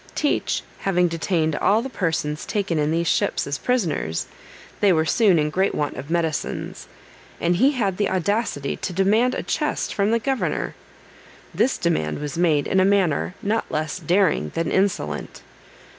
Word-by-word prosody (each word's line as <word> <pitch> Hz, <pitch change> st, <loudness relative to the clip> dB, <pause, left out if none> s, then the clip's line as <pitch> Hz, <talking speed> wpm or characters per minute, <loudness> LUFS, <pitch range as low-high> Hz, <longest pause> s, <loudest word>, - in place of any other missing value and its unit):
Teach 295 Hz, -, 0 dB, 0.2 s
having 180 Hz, -2 st, +2 dB
detained 165 Hz, -2 st, 0 dB
all 215 Hz, +4 st, +2 dB
the -, -, -3 dB
persons 160 Hz, -, -2 dB
taken 195 Hz, -6 st, -1 dB
in 150 Hz, 0 st, +1 dB
these 165 Hz, +1 st, 0 dB
ships -, -, +1 dB
as 140 Hz, -1 st, -3 dB
prisoners, 170 Hz, -, -1 dB, 0.5 s
they 200 Hz, -, +4 dB
were 160 Hz, -2 st, +2 dB
soon 195 Hz, 0 st, +4 dB
in 150 Hz, -1 st, +1 dB
great 190 Hz, +4 st, +1 dB
want 145 Hz, -1 st, -2 dB
of 140 Hz, +3 st, -8 dB
medicines, 165 Hz, -4 st, -2 dB, 0.5 s
and 175 Hz, +1 st, +1 dB
he 270 Hz, +7 st, +4 dB
had 200 Hz, -8 st, -1 dB
the 205 Hz, -, +1 dB
audacity 190 Hz, -6 st, -1 dB
to 180 Hz, -, -4 dB
demand 215 Hz, +7 st, +2 dB
a -, -, -3 dB
chest -, -, -1 dB
from 200 Hz, 0 st, +1 dB
the 230 Hz, -, +3 dB
governor. 230 Hz, -, -1 dB, 0.8 s
This 230 Hz, +9 st, +1 dB
demand 120 Hz, -, 0 dB
was 145 Hz, -1 st, -5 dB
made 160 Hz, -4 st, +2 dB
in 190 Hz, -, +2 dB
a -, -, +5 dB
manner 190 Hz, -3 st, +1 dB
not 220 Hz, +2 st, -1 dB
less 155 Hz, +3 st, -2 dB
daring 175 Hz, -, +2 dB
than 165 Hz, -1 st, -1 dB
insolent. 185 Hz, -, -1 dB
180 Hz, 165 wpm, -23 LUFS, 155-205 Hz, 0.8 s, a